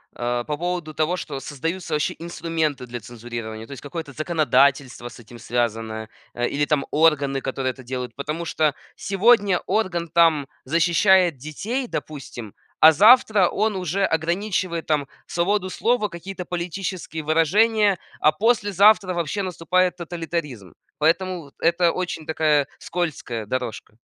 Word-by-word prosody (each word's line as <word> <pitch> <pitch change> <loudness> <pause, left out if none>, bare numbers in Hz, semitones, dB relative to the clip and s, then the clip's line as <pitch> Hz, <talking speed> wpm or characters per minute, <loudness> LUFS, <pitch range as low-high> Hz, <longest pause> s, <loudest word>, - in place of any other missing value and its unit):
э, 120 0 -1
по 150 -1 -2
поводу 175 -1 -3
того, 155 +4 0
что 145 -6 -5
создаются 165 +5 -4
вообще 150 - 0
инструменты 165 -5 -2
для 120 0 -6
цензурирования, 115 -1 -7
то - - -14
есть 140 - -8
какое-то 145 0 -6
законодательство 140 -5 +1
с 120 - -12
этим 120 +1 -13
связанное, 115 -2 -2 0.2
э, 120 0 -1
или 145 +1 0
там 145 -1 +1
органы, 145 -3 +2
которые 130 0 -2
это 130 +1 -13
делают. 125 0 -5
Потому 150 +4 -4
что 155 -2 +1 0.2
сегодня 200 -1 +3
орган, 175 -6 -1
там, 165 -4 +3 0.2
защищает 175 0 +3
детей, 210 - -4
допустим, 125 - -7 0.3
а 160 - +10
завтра 210 - +6
он 215 0 0
уже 185 +1 -1
ограничивает 170 +1 -1
там 150 -3 +1 0.2
свободу 185 +2 0
слова, 230 +2 +1
какие-то 185 +1 -7
политические 175 -1 -4
выражения, 200 +6 +3 0.2
а 155 - +5
послезавтра 205 0 +3
вообще 175 +4 -2
наступает 180 0 +1
тоталитаризм. 165 - -5 0.2
Поэтому 170 -1 0
это 170 +1 +3
очень 175 -3 -4
такая 150 -3 +2
скользкая 150 -10 -3
дорожка. 115 -2 -5
160 Hz, 135 wpm, -23 LUFS, 140-185 Hz, 0.3 s, а